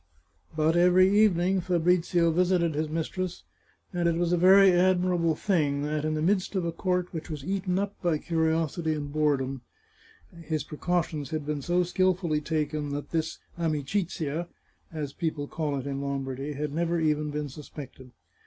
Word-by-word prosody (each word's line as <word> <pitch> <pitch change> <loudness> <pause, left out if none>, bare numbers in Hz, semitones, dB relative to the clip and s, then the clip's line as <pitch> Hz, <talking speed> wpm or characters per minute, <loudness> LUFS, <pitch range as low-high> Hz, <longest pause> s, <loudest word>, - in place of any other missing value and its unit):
But 155 +1 +2
every 180 +3 +5
evening 190 -2 +3
Fabrizio 175 -1 +2
visited 175 -1 +2
his 155 +1 -2
mistress, 170 +3 -3 0.5
and 175 -1 +1
it 165 - 0
was 175 +1 +1
a - - +5
very 190 +2 +7
admirable 180 -2 +2
thing 150 -7 0
that, 150 0 -2
in 155 0 0
the 155 - -1
midst 190 +2 +1
of 185 -3 0
a 170 - -1
court 180 +1 -1
which 160 0 -6
was 150 -3 -6
eaten 185 -1 -1
up 200 +1 -1
by 170 -4 +1
curiosity 160 0 0
and 145 -1 -5
boredom, 135 -4 0 0.8
his 155 -2 -2
precautions 155 -2 -2
had 155 -2 -3
been 150 -1 -2
so 175 +5 +1
skilfully 180 -3 +1
taken 150 -1 -2
that 145 0 -5
this 160 -1 -1 0.2
amicizia, 165 0 -2 0.4
as 150 -4 -5
people 155 -4 -3
call 150 -3 -2
it 135 - -5
in 140 -1 -3
Lombardy, 135 0 -3
had 145 0 -4
never 170 +1 0
even 150 -1 +1
been 150 0 -3
suspected. 135 -2 -10
160 Hz, 165 wpm, -27 LUFS, 150-180 Hz, 0.8 s, very